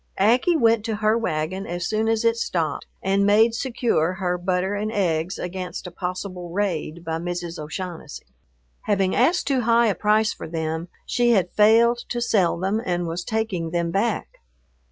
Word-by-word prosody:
Aggie 245 - +3
went 230 -5 +3
to 225 -2 -1
her 215 +1 +2
wagon 185 -2 -2
as 175 0 -3
soon 220 +1 0
as 225 0 +1
it 230 0 +4
stopped 170 -8 -2 0.2
and 195 +1 +2
made 215 +3 +4
secure 235 - 0
her 185 -2 -1
butter 180 +2 -1
and 210 +1 -2
eggs 175 -4 0
against 180 +1 -5
a 180 - -7
possible 180 0 -5
raid 170 -3 -2
by 160 0 -2
Mrs. 175 -1 -4
O'Shaughnessy. 160 0 -7 0.6
Having 195 -2 +1
asked 330 +9 +3
too 270 -3 +1
high 235 0 +4
a 215 - +2
price 215 +2 +2
for - - -8
them, 160 +1 -3 0.2
she 240 -1 +2
had 185 -5 +1
failed 230 +3 +5
to 240 - -2
sell 205 -8 +2
them 195 +5 -1
and 175 -1 -1
was 170 +1 -3
taking 220 -7 -2
them 170 0 -1
back. 205 +4 -1
195 Hz, 175 wpm, -23 LUFS, 175-225 Hz, 0.6 s, failed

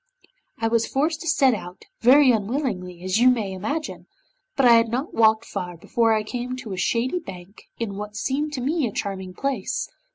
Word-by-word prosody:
I 225 - 0
was 230 0 +1
forced 310 +3 0
to 335 - -6
set 275 -5 +4
out, 180 -3 -7
very 260 +2 +6
unwillingly, 205 - -2
as 185 +3 +1
you 250 +1 +6
may 225 -6 0
imagine, 285 - -4 0.5
but 270 - +2
I 240 - +8
had 230 0 +2
not 255 +8 -3
walked 220 0 +4
far 180 -1 -5
before 230 +7 +1
I 215 -1 +1
came 245 +3 -4
to 225 -6 -7
a - - -3
shady 240 - 0
bank 190 - -11
in 205 -4 -4
what 210 0 -6
seemed 280 +7 -1
to 260 - -3
me 290 +1 0
a - - -5
charming 190 -2 -5
place. 265 -6 -2
230 Hz, 195 wpm, -23 LUFS, 200-265 Hz, 0.5 s, I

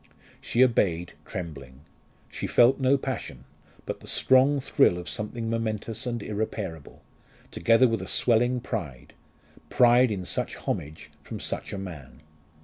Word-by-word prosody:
She 120 - +3
obeyed 90 -9 +1
trembling. 70 -7 -8 0.5
She - - -4
felt 125 +3 +4
no 135 +1 +3
passion, 130 - -5 0.4
but - - -5
the - - -13
strong 135 +2 +4
thrill 135 -7 +3
of 90 0 -7
something 115 +2 -4
momentous 115 0 -3
and 120 -3 -3
irreparable, 100 -7 -5 0.5
together 115 +3 +4
with 115 -4 -1
a 95 - -7
swelling 120 +1 +2
pride 85 - -6 0.6
pride 125 +1 +5
in 95 -4 -4
such - - -1
homage 75 +2 -5
from - - -8
such - - -3
a - - -4
man. 85 -8 -9
110 Hz, 140 wpm, -26 LUFS, 90-125 Hz, 0.6 s, pride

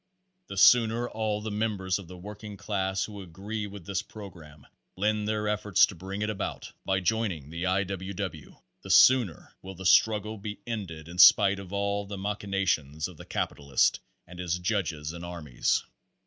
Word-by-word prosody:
The 100 - -7
sooner 115 +3 +5
all 110 -2 -2
the 110 0 -4
members 105 -3 -1
of 95 - -11
the 90 +1 -10
working 105 +2 -9
class 95 -2 -1
who 105 -2 -9
agree 100 +4 -5
with 100 -3 -10
this 100 0 -1
program 90 -9 -12 0.3
lend 105 +2 0
their 105 -1 -1
efforts 105 -2 +4
to - - -9
bring 95 +4 -5
it 105 - -1
about 100 - -5
by 95 0 0
joining 90 -8 -1
the 85 +2 -3
I. 95 +2 +2
W. 95 0 -5
W. 90 -6 -6 0.3
the - - -11
sooner 120 - +5
will 95 0 -9
the 95 +2 -9
struggle 105 +2 +3
be 105 0 -6
ended 90 -9 -5
in 85 +1 -8
spite 100 +1 +7
of 95 -2 -10
all 100 0 -1
the 100 0 -6
machinations 95 -7 -1
of 90 -4 -13
the - - -11
capitalist 70 -2 0 0.3
and 90 +1 -12
his 90 -1 -1
judges 85 -6 -2
and 85 0 -8
armies. 85 -8 -1
100 Hz, 175 wpm, -28 LUFS, 90-105 Hz, 0.3 s, spite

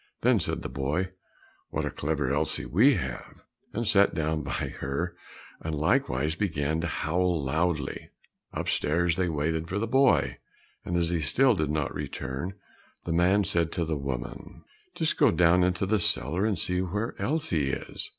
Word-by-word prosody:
Then - - +4
said - - -2
the - - -3
boy, 75 +8 -1 0.6
"What - - -2
a - - -2
clever 75 -3 -1
Elsie 75 - -1
we 125 - +5
have!" 65 -2 -6 0.3
and 115 +2 -2
sat 100 -4 +4
down 80 -1 0
by 70 - -3
her, 85 +6 -2 0.4
and 80 -1 -3
likewise 75 -1 +1
began 80 -4 -1
to 85 - -1
howl 85 +1 0
loudly. 80 +1 -1 0.4
Upstairs 85 +2 +1
they 90 -1 0
waited 80 +1 -1
for 95 - -2
the 110 - 0
boy, 130 +3 +3 0.4
but 90 - -3
as 85 -1 +1
he 85 - +1
still 125 - +4
did 75 -7 -1
not 75 -1 -1
return, 70 +9 -4 0.5
the 85 - -2
man 90 +4 +4
said 85 -4 +1
to 85 -2 -1
the 80 -1 -1
woman, 70 -4 -6 0.3
"Just - - +1
go - - +5
down 90 +2 +4
into 90 +1 +1
the 105 +2 +2
cellar 90 +5 +1
and 105 -4 0
see 90 +3 0
where 105 +6 -2
Elsie 100 - 0
is!" - - -4
85 Hz, 170 wpm, -28 LUFS, 75-95 Hz, 0.6 s, we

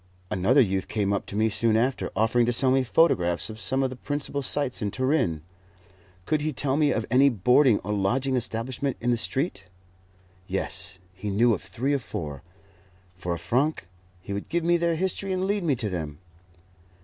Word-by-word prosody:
Another 110 +10 +4
youth 95 -4 0
came 105 -2 0
up 100 - -2
to - - -6
me 110 +1 +3
soon 110 +1 +2
after, 130 +3 0
offering 115 +3 +2
to - - +3
sell 130 +2 +4
me 135 0 +4
photographs 95 - +2
of 110 - -10
some 135 0 0
of 130 - -1
the - - -6
principal 145 +1 -3
sights 140 -2 -1
in 105 - 0
Turin. 130 - 0 0.8
Could 155 -1 0
he 155 +1 -1
tell 135 0 -1
me 150 -1 +3
of 110 - -1
any 135 +2 +6
boarding 125 +2 +4
or 105 +3 -3
lodging 125 +7 +1
establishment 125 +4 -2
in 120 +1 0
the - - +3
street? 130 - -2 0.8
Yes, 95 0 -2 0.2
he 95 +2 -5
knew 115 +4 +3
of 95 - -3
three 115 +9 -2
or 140 - +1
four. 75 - -6 0.7
For 90 0 -5
a - - -5
franc 130 - 0 0.3
he 100 - -7
would 100 - -5
give 170 0 0
me 175 +1 +3
their 170 -1 +1
history 190 +3 -2
and 185 0 -1
lead 200 0 0
me 150 -5 +2
to 115 -3 -1
them. 80 -5 -4
120 Hz, 195 wpm, -26 LUFS, 100-140 Hz, 0.8 s, any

